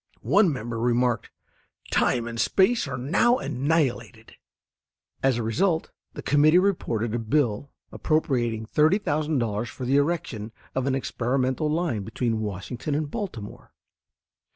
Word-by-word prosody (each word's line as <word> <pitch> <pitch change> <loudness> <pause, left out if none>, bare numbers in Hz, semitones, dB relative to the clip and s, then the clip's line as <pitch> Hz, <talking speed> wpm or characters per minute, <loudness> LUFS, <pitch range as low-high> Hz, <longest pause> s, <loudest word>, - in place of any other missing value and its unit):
One 200 -5 +4
member 120 -3 -4
remarked, 120 0 +1 0.6
"Time 120 -2 +2
and 115 0 -2
space 200 0 +2
are 130 -2 -4
now 175 - +2
annihilated." 125 - -1 0.9
As 135 -3 +2
a 120 - -2
result 160 - 0 0.2
the - - -7
committee 150 +3 +4
reported 120 - 0
a 120 - 0
bill 120 +1 0 0.2
appropriating 120 -8 0
$30,000 150 - +1
for 130 - -7
the 135 +3 +3
erection 140 -8 -1 0.2
of 130 0 -1
an 135 - +1
experimental 130 +3 -1
line 155 -9 -1
between 115 +2 -2
Washington 110 +8 -4
and 150 -1 -2
Baltimore. 120 - -7
130 Hz, 125 wpm, -25 LUFS, 115-155 Hz, 0.9 s, One